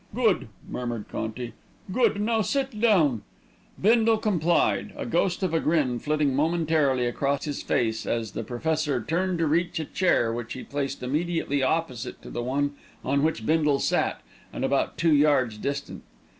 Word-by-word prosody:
"Good," 235 - +2 0.2
murmured 120 -3 -4
Conti. 115 +1 -4 0.4
"Good! 235 -1 +2
Now 220 +1 +1
sit 265 +1 -1
down." 160 - +4 0.6
Bindle 225 +2 +4
complied, 175 -6 +1
a - - -4
ghost 175 +2 0
of 180 -3 0
a 165 - +3
grin 145 -8 +1
flitting 150 0 0
momentarily 155 -4 +2
across 140 +3 -1
his 145 -2 -3
face, 110 -2 0
as 115 -3 -1
the - - -4
Professor 150 +2 -1
turned 180 +5 0
to 165 - +1
reach 170 +3 +1
a 160 - -2
chair 130 -10 +1
which 120 -1 -5
he 130 - -7
placed 140 -2 -4
immediately 150 +1 -1
opposite 130 -4 -1
to - - -9
the 120 - -3
one 140 +4 0 0.3
on 140 +2 +2
which 155 -7 0
Bindle 150 -2 +3
sat, - - 0 0.3
and - - -2
about - - 0
two 165 -1 +3
yards 140 -7 +3
distant. 140 +4 -4
150 Hz, 160 wpm, -26 LUFS, 130-170 Hz, 0.6 s, down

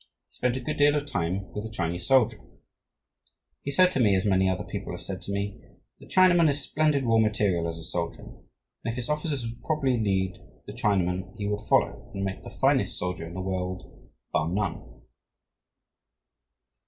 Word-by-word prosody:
He - - -32
spent 125 0 +1
a - - -4
good 150 +4 -3
deal 145 0 +5
of 145 -1 0
time 95 - -2
with 105 - -4
the 110 - -5
Chinese 85 -4 -2
soldier. 130 -4 +4 1.2
He - - -4
said 180 +6 +5
to 135 - -1
me, 105 -5 +5
as 95 - +1
many 95 -2 +3
other 95 - -1
people - - -5
have - - -7
said - - -5
to - - -6
me, 100 0 -3 0.4
'The - - -14
Chinaman 175 -3 +5
is 145 0 +1
splendid 150 0 +1
raw 115 -1 +4
material 105 -6 +2
as 85 0 -4
a 80 - -8
soldier, 85 +1 -3
and, - - -12 0.5
if 115 0 -1
his 125 +1 -3
officers 150 -4 -1
would 115 +1 -7
properly 140 -6 +1
lead 95 -3 0 0.3
the 105 - -8
Chinaman, 95 -4 0
he 100 - -3
would 105 0 -1
follow - - +2
and 100 - -2
make 95 0 -4
the - - -9
finest - - +1
soldier 90 -2 -3
in 85 - -9
the 95 - -3
world, 95 -1 -5 0.2
bar 75 +2 +1
none.' 90 -10 -3
105 Hz, 190 wpm, -27 LUFS, 95-130 Hz, 1.2 s, deal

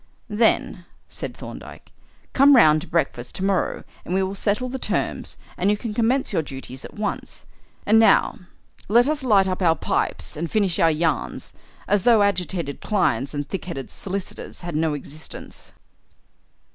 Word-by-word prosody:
"Then," 210 -5 +1 0.2
said - - -7
Thorndyke, - - -10 0.4
"come 280 +1 +7
round 155 -10 +6
to 180 - -9
breakfast 135 -7 -2
to 190 - -4
morrow 195 -2 0 0.2
and 180 - -3
we 190 - +2
will 190 +1 -2
settle 205 +5 0
the 260 +1 -5
terms, - - -2 0.2
and 190 - +1
you 210 - +2
can 220 0 -5
commence 240 +5 +1
your - - +2
duties 135 -2 -8
at - - -10
once. 210 -1 -4 0.4
And 220 +2 +5
now 225 +1 +4 0.5
let 240 +4 +5
us 300 -1 0
light 205 -7 +4
our 185 -3 +2
pipes - - -1
and 165 +2 -3
finish 200 -6 +1
our 165 - +5
yarns 155 -2 -1 0.3
as 205 0 +3
though 225 -1 +5
agitated 180 -7 -1
clients 140 - 0
and 145 0 -3
thick 195 - -5
headed 140 -7 -6
solicitors 195 0 -6
had 175 -3 -5
no 155 -1 +1
existence." 145 +2 -9
190 Hz, 160 wpm, -23 LUFS, 160-215 Hz, 0.5 s, come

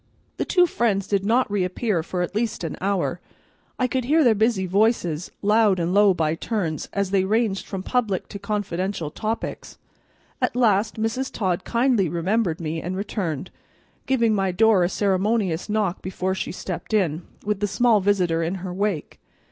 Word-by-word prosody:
The - - -1
two 360 -2 +4
friends 220 - 0
did 200 -1 0
not 230 +2 +2
reappear 190 0 0
for 180 +2 -2
at 175 - -4
least 220 -3 -2
an 165 - -3
hour. 190 -2 0 0.6
I 255 - +1
could 255 0 -1
hear 310 +4 +4
their 240 -4 +5
busy 215 -2 +1
voices, 185 -4 +1
loud 210 -2 +4
and 170 +1 0
low 205 0 +6
by 160 -2 +1
turns, 165 -3 -3
as 200 -1 -1
they 195 -1 +3
ranged 210 0 0
from 190 -2 -5
public 220 -6 -1
to 200 - -7
confidential 190 -5 -2
topics. 220 +5 -4 0.6
At - - 0
last 220 -3 +2
Mrs. 235 +5 -1
Todd 185 -5 -1
kindly 235 -6 +2
remembered 175 +1 0
me 160 -1 -3
and 185 +2 -4
returned, 185 - -3 0.6
giving 235 -4 +2
my 195 -2 +1
door 210 0 +4
a 175 - +1
ceremonious 195 -2 0
knock 210 -4 0
before 185 0 -2
she 190 - -3
stepped 185 +3 -4
in, 170 -6 +1 0.2
with 210 -1 -1
the 205 - 0
small 230 +1 +3
visitor 180 -4 +2
in 165 +3 -1
her 185 -1 -5
wake. 195 -5 -2
200 Hz, 170 wpm, -23 LUFS, 180-220 Hz, 0.6 s, low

